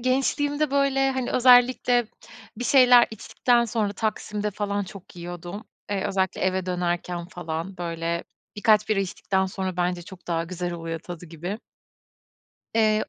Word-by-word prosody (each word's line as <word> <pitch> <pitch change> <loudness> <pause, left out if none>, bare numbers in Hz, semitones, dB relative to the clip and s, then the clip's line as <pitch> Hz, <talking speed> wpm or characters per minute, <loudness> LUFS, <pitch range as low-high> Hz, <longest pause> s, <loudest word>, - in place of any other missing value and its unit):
gençliğimde, 285 +3 +1
böyle, 275 -1 +2
hani, 260 -2 -2
özellikle 245 -1 +5 0.5
bir 245 - -4
şeyler 250 -2 +7
içtikten 235 +2 +1
sonra 215 -3 -1
Taksim'de 210 0 -2
falan 205 0 -2
çok 185 -1 -12
yiyordum. 175 +4 -7 0.3
Eee, 195 -2 -1
özellikle 190 -1 -1
eve 185 0 0
dönerken 175 -1 -2
falan, 175 +1 -5
böyle, 170 -1 -3 0.3
bir 205 - -7
kaç 215 -1 +4
bira 215 -2 +2
içtikten 190 0 -1
sonra 185 -1 -4
bence 175 0 0
çok 185 +1 -13
daha 165 -1 0
güzel 175 0 -4
oluyor 165 -1 -4
tadı 175 +1 -9
gibi. 175 +6 -5 1.2
Eee 215 -1 +3
195 Hz, 140 wpm, -25 LUFS, 175-235 Hz, 1.2 s, şeyler